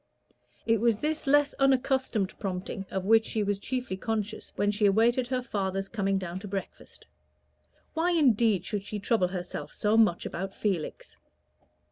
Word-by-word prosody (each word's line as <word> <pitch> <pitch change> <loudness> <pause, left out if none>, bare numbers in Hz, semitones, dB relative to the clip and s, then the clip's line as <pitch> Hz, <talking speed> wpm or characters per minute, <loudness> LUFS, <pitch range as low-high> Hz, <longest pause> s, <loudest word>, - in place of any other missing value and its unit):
It 225 -2 +2
was 230 -3 +3
this 305 +4 -2
less 290 +1 +4
unaccustomed 265 -6 +1
prompting 190 0 -4
of 190 -1 -3
which 225 +2 +5
she 220 -1 -1
was 205 -1 -1
chiefly 250 -4 -3
conscious 220 0 -3
when 205 0 +1
she 205 0 +2
awaited 235 +5 +3
her 255 -1 -1
father's 195 -4 -2
coming 195 -2 0
down 185 -1 -4
to 205 - -8
breakfast. 195 -1 -7 0.9
Why, 325 +2 +1
indeed, 230 - +3
should 205 -2 -2
she 210 +1 -5
trouble 205 -2 +1
herself 180 -1 -5
so 210 +1 +1
much 210 -6 +3
about 190 +2 -5
Felix? 200 - -3
210 Hz, 155 wpm, -28 LUFS, 195-245 Hz, 0.9 s, which